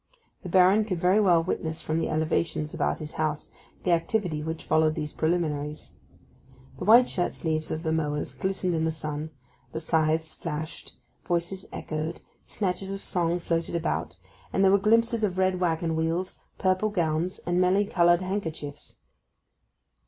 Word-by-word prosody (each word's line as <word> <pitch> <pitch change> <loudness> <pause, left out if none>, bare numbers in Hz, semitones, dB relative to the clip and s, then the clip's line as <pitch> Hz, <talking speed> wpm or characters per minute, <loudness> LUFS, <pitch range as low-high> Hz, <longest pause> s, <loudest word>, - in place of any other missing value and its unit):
The 185 - -7
Baron 190 +4 +5
could 185 -5 -2
very 185 +4 +4
well 175 -5 +4
witness 160 -2 -3
from 155 +1 0
the - - -1
elevations 155 0 0
about - - 0
his 155 0 -7
house 155 -1 -2 0.3
the 180 - +1
activity 170 -1 0
which 160 +1 -4
followed 155 0 +2
these 150 -2 -3
preliminaries. 155 -3 -1 0.9
The - - -4
white 240 +3 +7
shirt 175 - -1
sleeves 155 -1 -2
of 155 - -3
the 160 - 0
mowers 150 -2 -1
glistened 190 -1 -1
in 160 -1 0
the 160 - +1
sun, 155 0 -4 0.4
the 160 - -2
scythes 160 0 +1
flashed, 160 -1 -6 0.3
voices 175 +2 -1
echoed, 155 +1 -4 0.3
snatches 190 -1 -2
of 195 - -7
song 175 -1 +1
floated 170 -1 -2
about, 170 0 -2 0.3
and 195 - +2
there 190 - +6
were 200 - +5
glimpses 230 +2 +3
of 185 -3 0
red 185 -1 +2
waggon 165 -2 0
wheels, 165 +3 -1 0.2
purple 185 +3 +2
gowns, 170 -2 0
and 175 +1 +2
many 190 +3 +3
coloured 175 -2 +4
handkerchiefs. 160 -7 -4
170 Hz, 160 wpm, -27 LUFS, 160-185 Hz, 0.9 s, white